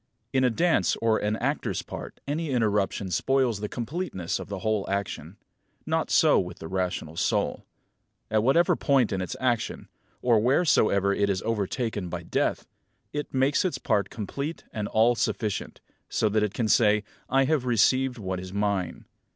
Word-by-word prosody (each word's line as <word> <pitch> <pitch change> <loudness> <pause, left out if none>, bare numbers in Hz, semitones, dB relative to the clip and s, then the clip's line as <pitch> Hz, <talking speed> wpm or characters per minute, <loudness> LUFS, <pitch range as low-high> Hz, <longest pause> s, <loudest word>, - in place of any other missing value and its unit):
In 130 -1 +3
a 125 - +4
dance 165 +8 +2
or 115 -1 +1
an 105 +1 0
actor's - - -2
part - - -8
any 155 +2 -2
interruption 105 -6 0
spoils 130 +2 +1
the 105 0 -4
completeness 120 - -3
of - - -8
the 100 - -4
whole 110 -2 0
action. 100 0 -3 0.5
Not - - 0
so - - +5
with - - -4
the 80 - -8
rational 90 -3 -3
soul. - - -1 0.6
At 110 -1 +3
whatever 140 +9 +4
point 135 -6 +2
in 95 -2 -1
its 90 - -4
action, 120 -3 -1 0.3
or 120 -3 +4
wheresoever 105 - +3
it 100 0 +1
is 95 -2 -1
overtaken 110 -2 -2
by - - -5
death, - - -1 0.5
it 145 -1 -4
makes 135 +6 +2
its 185 - -1
part 105 -6 0
complete 140 - -5
and 105 -2 -3
all 115 +3 +4
sufficient; 110 -3 -2 0.3
so 110 - +1
that 110 +1 +1
it 105 -2 -1
can 115 - 0
say, 105 -1 +4 0.3
"I 135 +1 +4
have 140 -2 +1
received 125 +2 +3
what 95 -4 -3
is 90 0 -8
mine." 100 -3 -1
110 Hz, 165 wpm, -26 LUFS, 100-130 Hz, 0.6 s, so